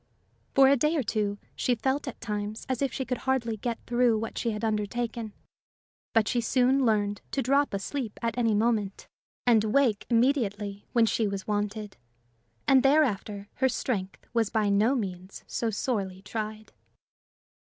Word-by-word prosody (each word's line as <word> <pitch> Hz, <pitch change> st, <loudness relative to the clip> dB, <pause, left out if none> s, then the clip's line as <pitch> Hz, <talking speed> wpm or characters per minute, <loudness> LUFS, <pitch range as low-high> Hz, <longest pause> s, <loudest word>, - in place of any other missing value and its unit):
For 270 Hz, -1 st, +7 dB
a 275 Hz, -, +6 dB
day 300 Hz, +5 st, +1 dB
or 280 Hz, -, +1 dB
two, 210 Hz, -2 st, -1 dB, 0.2 s
she 250 Hz, -, +1 dB
felt 265 Hz, +5 st, -1 dB
at 260 Hz, -, -6 dB
times 210 Hz, 0 st, -4 dB
as 260 Hz, -1 st, -2 dB
if 275 Hz, -3 st, +1 dB
she 265 Hz, -, -3 dB
could 250 Hz, -, -2 dB
hardly 255 Hz, -4 st, 0 dB
get 230 Hz, +2 st, -2 dB
through 240 Hz, -2 st, +3 dB
what 225 Hz, +1 st, -4 dB
she 235 Hz, -, -1 dB
had 215 Hz, 0 st, -2 dB
undertaken; 220 Hz, +1 st, -2 dB, 0.8 s
but 225 Hz, -2 st, +3 dB
she 240 Hz, -, +1 dB
soon 255 Hz, +3 st, +3 dB
learned 205 Hz, -2 st, +1 dB
to 275 Hz, -, -1 dB
drop 280 Hz, +3 st, +2 dB
asleep 215 Hz, +3 st, -4 dB
at 230 Hz, -2 st, -2 dB
any 230 Hz, -3 st, +2 dB
moment, 215 Hz, -2 st, 0 dB, 0.4 s
and 230 Hz, -3 st, +5 dB
wake 220 Hz, -1 st, +2 dB
immediately 220 Hz, -5 st, +1 dB
when 235 Hz, -2 st, +5 dB
she 220 Hz, -1 st, +1 dB
was 200 Hz, -1 st, -4 dB
wanted; 210 Hz, 0 st, -3 dB, 0.7 s
and 265 Hz, -1 st, +6 dB
thereafter 230 Hz, -8 st, +2 dB
her 260 Hz, 0 st, +3 dB
strength 195 Hz, -7 st, -3 dB
was 230 Hz, -3 st, +2 dB
by 215 Hz, -2 st, +1 dB
no 210 Hz, +6 st, +3 dB
means 185 Hz, -5 st, -5 dB
so 230 Hz, -, -2 dB
sorely 195 Hz, -4 st, -2 dB
tried. 215 Hz, +1 st, -5 dB
225 Hz, 165 wpm, -28 LUFS, 205-250 Hz, 0.8 s, For